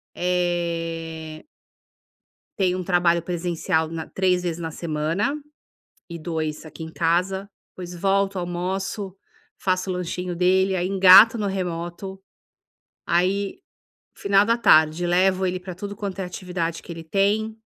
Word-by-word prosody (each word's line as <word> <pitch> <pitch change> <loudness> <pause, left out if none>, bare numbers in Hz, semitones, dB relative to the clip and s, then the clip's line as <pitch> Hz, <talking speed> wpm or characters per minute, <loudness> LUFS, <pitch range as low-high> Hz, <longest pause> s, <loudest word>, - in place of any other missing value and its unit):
Eh 165 -3 -2 1.1
Tenho 185 -2 +1
um 180 - -4
trabalho 175 -2 +3
presencial 170 -1 -1
na 165 0 -5
3 180 -1 +1
vezes 170 -1 -3
na 165 -1 -4
semana 165 - -1 0.8
e 170 - -6
2 160 -1 -4
aqui 160 +1 -10
em 160 0 -7
casa, 185 +4 0 0.2
depois 180 -1 -9
volto, 195 +2 +1
almoço, 185 +2 -3 0.4
faço 185 0 -1
o 185 - 0
lanchinho 180 0 -3
dele, 190 +2 +2
aí 180 0 -1
engato 195 +4 +8
no 210 - -1
remoto. 185 0 -4 0.9
Aí, 195 - 0 0.6
final 200 0 +3
da 230 +2 +2
tarde, 160 -4 +4
levo 185 +1 +2
ele 180 0 -1
para 180 0 -8
tudo 200 +3 -7
quanto 200 -1 -5
é 190 - -1
atividade 180 -2 -4
que - - -9
ele 165 - -9
tem. 205 +5 0
180 Hz, 135 wpm, -23 LUFS, 170-190 Hz, 1.1 s, engato